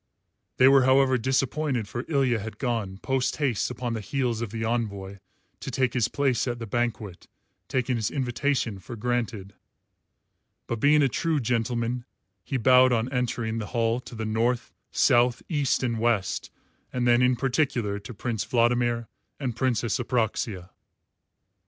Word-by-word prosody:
They 130 - +7
were 135 0 +7
however 130 0 +4
disappointed, 130 -1 0
for 120 +4 -5
Ilya 135 -7 +2
had 110 0 -7
gone, 115 -7 -2
post 130 -1 0
haste 135 -8 0
upon 125 -1 -3
the 110 - -3
heels 120 +1 -1
of 115 - -3
the 110 +1 -4
envoy, 100 -4 -3 0.4
to 135 - -6
take 130 -1 0
his 120 -4 +2
place 135 -4 0
at 120 -1 -2
the 115 - -6
banquet, 110 -4 -3 0.4
taking 130 -1 0
his 110 -1 -1
invitation 125 -4 -1
for 120 - -8
granted. 115 -4 -2 1.1
But 115 - -3
being 150 +4 +5
a - - +5
true 160 +4 0
gentleman, 120 0 -1 0.4
he 135 - -2
bowed 130 +1 +6
on 120 +2 0
entering 120 -2 -1
the 105 - -4
hall 115 +1 +2
to 125 - -11
the 110 0 -4
North, 115 +3 0 0.2
South, 120 0 +3
East, 145 -5 +1
and 115 -3 -1
West, 110 -5 0 0.4
and 125 -1 -1
then 120 0 +5
in 125 0 +4
particular 125 -6 0
to 105 +5 -10
Prince 115 0 -3
Vladimir 120 -1 +1 0.3
and 130 -5 -3
Princess 120 -2 0
Apraxia. 110 -6 -2
120 Hz, 155 wpm, -26 LUFS, 110-130 Hz, 1.1 s, They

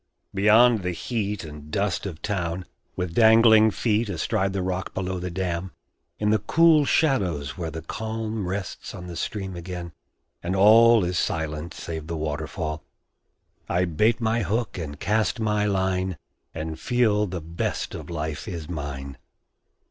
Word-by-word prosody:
Beyond 110 +3 +5
the 90 -1 -2
heat 105 +1 -3
And 75 -1 -10
dust 100 +2 -1
of 85 -4 -8
town, 90 -3 -2 0.3
with 90 -2 -3
dangling 110 0 +7
feet 110 +1 0
Astride 95 +2 0
the 95 -1 -2
rock 95 0 -3
below 95 -1 -2
the 90 +1 -4
dam, 90 -1 -3 0.4
In 105 0 +1
the 110 - +3
cool 160 -2 +4
shadows 95 - +1
where 85 -4 -4
the 80 0 -7
calm 110 +1 -4
Rests 95 0 -5
on 90 - -8
the 90 -1 -7
stream 95 +2 -4
again, 85 0 -6 0.5
and 90 +2 -2
all 110 +2 +7
Is 90 0 0
silent 80 +1 -2
save 80 -2 -6
the 85 -1 -3
waterfall, 75 0 -3 0.9
I 90 +1 +2
bait 105 +9 +2
my 115 0 +1
hook 110 +3 -1
and 75 -4 -6
cast 110 +3 0
my 105 -1 +1
line, 95 -2 0 0.3
And 80 0 -5
feel 110 -4 +2
the 90 -1 -4
best 85 +2 -3
of - - -7
life 80 0 -4
is 85 -6 -5
mine. 70 -4 -6
95 Hz, 155 wpm, -25 LUFS, 85-110 Hz, 0.9 s, dangling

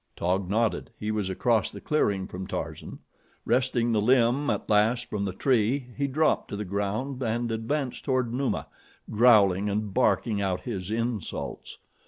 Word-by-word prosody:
Taug 90 +1 -1
nodded. 110 +2 0
He 105 0 -2
was 105 -3 -1
across 110 +4 +1
the - - -9
clearing 100 -11 0
from 95 +1 -7
Tarzan. - - -5 0.5
Wresting 120 -1 +1
the 110 -2 +2
limb 125 +4 +3
at - - -1
last 110 +4 +2
from 100 -1 -1
the 95 - -2
tree 125 +4 +1
he 140 0 0
dropped 155 +4 +1
to - - -5
the 105 +1 -4
ground 105 +8 -3
and 115 0 -1
advanced 125 +4 -2
toward 130 -4 0
Numa, 135 +1 -1 0.5
growling 105 -4 +5
and 105 0 -2
barking 115 -4 +2
out 95 -2 -1
his 100 -7 -5
insults. 115 -2 -4
115 Hz, 160 wpm, -27 LUFS, 100-125 Hz, 0.5 s, growling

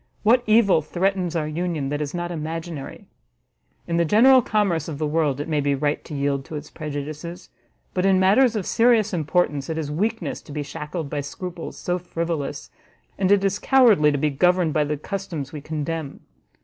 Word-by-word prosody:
What 235 +3 +5
evil 215 -6 +5
threatens 180 +1 -1
our 155 -2 -1
union, 155 -3 -2
that 145 +1 -2
is 145 -1 -3
not 175 0 -4
imaginary? 160 -2 -6 0.8
In 170 - -1
the 170 - +4
general 250 +9 +6
commerce 200 -8 0
of 155 -3 -5
the 155 - -1
world 150 -3 0
it 145 - -4
may 150 -2 0
be 140 0 +1
right 145 +1 -1
to 150 - -7
yield 140 -1 -1
to 160 - -8
its 150 0 -7
prejudices, 155 +4 -6 0.4
but 180 - 0
in 190 -1 +4
matters 225 +6 +4
of 205 -4 -2
serious 230 -3 +3
importance, 155 -3 0
it 160 - -2
is 150 -2 -3
weakness 220 +9 -2
to - - -13
be 145 0 -3
shackled 150 +3 -5
by 145 +1 -3
scruples 170 +4 -7
so 180 0 -2
frivolous, 170 -4 -4 0.5
and 190 0 +2
it 200 -1 +4
is 195 +1 0
cowardly 225 - +5
to 145 - 0
be 150 +1 +1
governed 180 +2 +2
by 150 -1 +2
the 150 0 -2
customs 165 -4 -5
we 150 - -6
condemn. 155 0 -4
165 Hz, 190 wpm, -23 LUFS, 150-190 Hz, 0.8 s, general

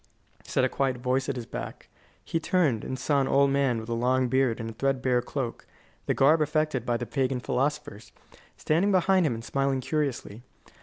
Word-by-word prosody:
said 130 - 0
a - - +4
quiet 130 -1 -1
voice 130 +2 -1
at 140 - -1
his 120 -2 -5
back. - - -7 0.4
He 165 - -1
turned, 160 -10 +1
and 130 - -4
saw 140 +1 +1
an 135 - 0
old 140 0 +3
man 135 -4 +1
with 110 - -8
a 120 - -2
long 125 +2 +1
beard 130 -2 +1
and 115 0 -5
a - - -11
threadbare 130 0 0
cloak 125 -1 -5 0.4
(the - - +1
garb 155 +4 +4
affected 155 -4 0
by 120 -1 +1
the 120 - -4
pagan 130 +2 -1
philosophers) 130 -4 -3 0.5
standing 175 +7 +1
behind 185 -2 +3
him 120 - -1
and 115 +1 -8
smiling 135 +1 0
curiously. 130 -6 -3
130 Hz, 195 wpm, -27 LUFS, 125-145 Hz, 0.5 s, a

